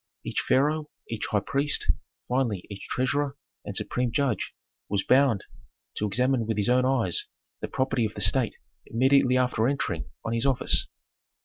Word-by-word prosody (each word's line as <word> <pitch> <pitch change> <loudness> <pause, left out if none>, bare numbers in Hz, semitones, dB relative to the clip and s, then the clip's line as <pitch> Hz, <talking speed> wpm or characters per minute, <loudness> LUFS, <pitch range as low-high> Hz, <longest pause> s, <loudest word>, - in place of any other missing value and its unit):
Each - - -2
pharaoh, 150 +3 +1 0.2
each 110 -2 -2
high 105 - +1
priest, 140 +5 +2 0.4
finally 120 -7 0
each 100 - -8
treasurer 140 +2 0 0.3
and - - -6
supreme 125 -1 -1
judge 135 -6 -1 0.3
was 100 -1 0
bound 130 -6 +3 0.5
to 105 - 0
examine 125 +2 +1
with 110 -2 -1
his 105 +3 +1
own 125 +1 +4
eyes 125 -9 +1 0.3
the - - -4
property 130 -3 0
of 105 - -5
the 105 - -4
state 110 +4 +2 0.3
immediately 130 +1 +3
after 125 -3 +2
entering 140 +1 -1 0.2
on 115 - -1
his 115 +3 +1
office. 135 -2 +3
125 Hz, 155 wpm, -27 LUFS, 110-135 Hz, 0.5 s, own